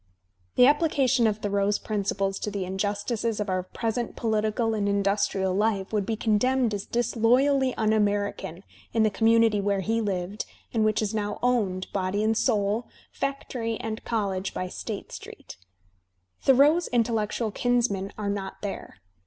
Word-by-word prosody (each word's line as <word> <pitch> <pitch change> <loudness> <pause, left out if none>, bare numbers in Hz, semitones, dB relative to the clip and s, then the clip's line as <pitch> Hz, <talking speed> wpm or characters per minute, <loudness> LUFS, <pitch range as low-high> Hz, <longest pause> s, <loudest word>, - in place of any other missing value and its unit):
The 250 - +7
application 270 -5 +3
of 210 -1 0
Thoreau's 200 -1 0
principles 195 -2 -2
to - - -3
the 200 -2 -3
injustices 205 +4 -2
of 210 -1 -2
our 185 0 0
present 225 +5 -3
political 220 0 0
and 205 -2 0
industrial 200 -1 +1
life 205 0 0
would 205 -2 0
be 225 - 0
condemned 230 +2 +1
as 200 -1 -4
disloyally 250 +3 +2
"^'un 220 0 +2
American" 205 -4 -1 0.3
in 225 -1 +3
the 215 - +3
community 225 -1 +3
where 200 -1 0
he 225 +4 0
lived 195 -1 -3 0.3
and 225 -2 +2
which 215 0 +2
is 210 0 -2
now 210 -1 -2
owned, 205 -7 +1
body 195 +2 0
and 220 +1 +2
soul,* 215 -1 +1 0.2
factory 250 -5 -3
and 220 0 -5
college, 195 -4 -2
by 185 - -2
State - - -6
Street. - - -10 0.8
Thoreau's 290 +6 +5
intellectual 225 -2 0
kinsmen 230 -5 0
are 210 -1 -3
not 195 0 -5
there. 200 - -5
215 Hz, 150 wpm, -26 LUFS, 200-230 Hz, 0.8 s, The